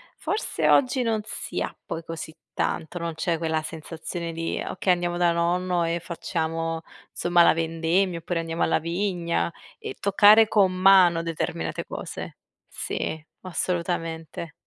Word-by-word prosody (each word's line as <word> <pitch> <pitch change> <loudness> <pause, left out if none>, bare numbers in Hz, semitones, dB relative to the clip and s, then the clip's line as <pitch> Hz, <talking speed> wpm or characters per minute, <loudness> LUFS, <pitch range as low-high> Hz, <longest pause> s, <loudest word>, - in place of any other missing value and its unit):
forse 425 - -1
oggi 260 -1 +4
non 225 -3 +1
si - - -5
ha - - -3
poi 165 - -4
così 160 -1 -6 0.2
tanto, 160 +3 -2
non 170 -1 -3
c'è 165 +1 0
quella 160 -1 0
sensazione 165 +2 -6
di: 165 0 -3
"Okay, 185 0 +1
andiamo 175 0 -1
da 175 -1 +3
nonno 175 +1 +1
e 165 +1 0
facciamo 165 -1 -3 0.3
somma 175 0 +3
la - - +6
vendemmia", 165 +2 0
oppure: 170 +1 -2
"Andiamo 165 0 -2
alla - - +2
vigna", 170 - -1 0.3
e - - -7
toccare 205 +2 +6
con 200 -4 +4
mano 185 -2 +6
determinate 120 - -3
cose. - - -7 0.3
Sì 160 - -3 0.2
assolutamente. 170 -3 -3
170 Hz, 140 wpm, -25 LUFS, 165-185 Hz, 0.3 s, la